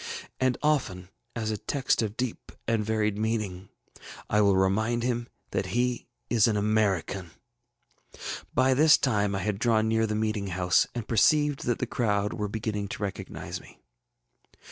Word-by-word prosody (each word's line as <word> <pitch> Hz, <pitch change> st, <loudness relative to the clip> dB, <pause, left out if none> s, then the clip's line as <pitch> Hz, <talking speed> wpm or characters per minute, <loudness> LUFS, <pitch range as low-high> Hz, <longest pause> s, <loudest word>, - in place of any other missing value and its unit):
And 130 Hz, -1 st, +2 dB
often, 100 Hz, -12 st, 0 dB, 0.3 s
as 110 Hz, -2 st, -2 dB
a 105 Hz, -, -3 dB
text 135 Hz, -4 st, 0 dB
of 110 Hz, -1 st, -3 dB
deep 125 Hz, -2 st, -4 dB, 0.2 s
and 115 Hz, -1 st, +1 dB
varied 105 Hz, -1 st, 0 dB
meaning, 105 Hz, -4 st, -2 dB, 0.6 s
I 105 Hz, -, +4 dB
will 100 Hz, -2 st, +4 dB
remind 110 Hz, +5 st, +1 dB
him 120 Hz, -1 st, -1 dB, 0.2 s
that -, -, -1 dB
he 125 Hz, 0 st, 0 dB, 0.2 s
is 115 Hz, -3 st, +4 dB
an 110 Hz, -2 st, +1 dB
American.ŌĆÖ 100 Hz, -4 st, -4 dB
ŌĆ£By 130 Hz, +1 st, +4 dB
this 150 Hz, +3 st, +7 dB
time 105 Hz, -6 st, +1 dB
I 95 Hz, -, -2 dB
had 105 Hz, -2 st, -1 dB
drawn 110 Hz, -2 st, +2 dB
near 110 Hz, 0 st, +2 dB
the 105 Hz, -, -2 dB
meeting 110 Hz, -2 st, -1 dB
house, 90 Hz, -2 st, +2 dB
and 120 Hz, -3 st, -4 dB
perceived 145 Hz, +5 st, +3 dB
that 120 Hz, -, +1 dB
the -, -, -1 dB
crowd 105 Hz, -4 st, 0 dB
were 105 Hz, -2 st, -2 dB
beginning 105 Hz, -1 st, -3 dB
to 105 Hz, -, -5 dB
recognize 100 Hz, -, -5 dB
me. -, -, -17 dB
110 Hz, 160 wpm, -27 LUFS, 100-120 Hz, 0.6 s, this